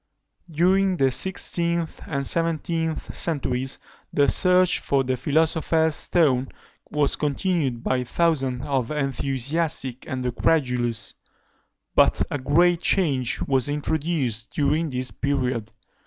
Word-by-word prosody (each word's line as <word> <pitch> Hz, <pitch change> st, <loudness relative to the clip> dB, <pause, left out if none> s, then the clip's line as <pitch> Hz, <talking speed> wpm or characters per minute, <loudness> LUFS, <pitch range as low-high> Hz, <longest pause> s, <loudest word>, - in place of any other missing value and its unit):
During 185 Hz, +3 st, +2 dB
the 135 Hz, -3 st, +2 dB
sixteenth 170 Hz, 0 st, 0 dB
and 140 Hz, -2 st, -2 dB
seventeenth 165 Hz, 0 st, -2 dB
centuries, 135 Hz, -5 st, -1 dB, 0.3 s
the 145 Hz, -1 st, +3 dB
search 180 Hz, +2 st, +4 dB
for 135 Hz, -1 st, 0 dB
the 130 Hz, 0 st, -1 dB
philosopher's 160 Hz, +3 st, +1 dB
stone 140 Hz, -5 st, +1 dB, 0.4 s
was 150 Hz, -2 st, +1 dB
continued 145 Hz, -4 st, -1 dB
by 130 Hz, -1 st, 0 dB
thousands 135 Hz, -2 st, 0 dB
of 135 Hz, -5 st, -1 dB
the 150 Hz, -, -4 dB
enthusiastic 135 Hz, 0 st, -2 dB
and 130 Hz, -1 st, -4 dB
the 125 Hz, -, 0 dB
credulous; 125 Hz, -5 st, 0 dB, 0.8 s
but -, -, +4 dB
a 145 Hz, -, -2 dB
great 170 Hz, +6 st, +3 dB
change 135 Hz, -10 st, +1 dB
was 135 Hz, -1 st, +1 dB
introduced 145 Hz, -6 st, -2 dB
during 150 Hz, +3 st, 0 dB
this 130 Hz, -1 st, -2 dB
period. 130 Hz, -5 st, -2 dB
145 Hz, 115 wpm, -24 LUFS, 130-165 Hz, 0.8 s, search